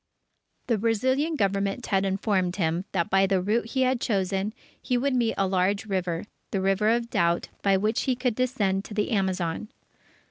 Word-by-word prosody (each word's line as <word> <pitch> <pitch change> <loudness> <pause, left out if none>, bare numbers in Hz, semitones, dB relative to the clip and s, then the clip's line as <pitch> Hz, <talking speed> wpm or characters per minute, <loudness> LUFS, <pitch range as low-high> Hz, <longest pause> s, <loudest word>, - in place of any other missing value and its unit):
The 230 -4 +1
Brazilian 260 +8 +1
Government 200 0 0
had 195 -1 +1
informed 190 -2 0
him 170 0 0
that 170 -3 -1
by 195 0 +4
the 190 -1 +2
route 215 +5 0
he 260 +3 0
had 255 -1 +1
chosen, 195 -1 0 0.3
he 250 -2 0
would 270 +2 0
meet 235 -3 +1
a 195 - +2
large 190 +2 +1
river 180 -4 -2 0.3
the 195 - -1
River 195 +3 +2
of 235 +1 0
Doubt 170 0 +1
by 195 -1 +3
which 215 +4 0
he 255 - +3
could 250 -1 0
descend 215 -6 0
to 210 - -8
the 210 +2 0
Amazon. 190 -1 -1
200 Hz, 180 wpm, -26 LUFS, 190-235 Hz, 0.3 s, by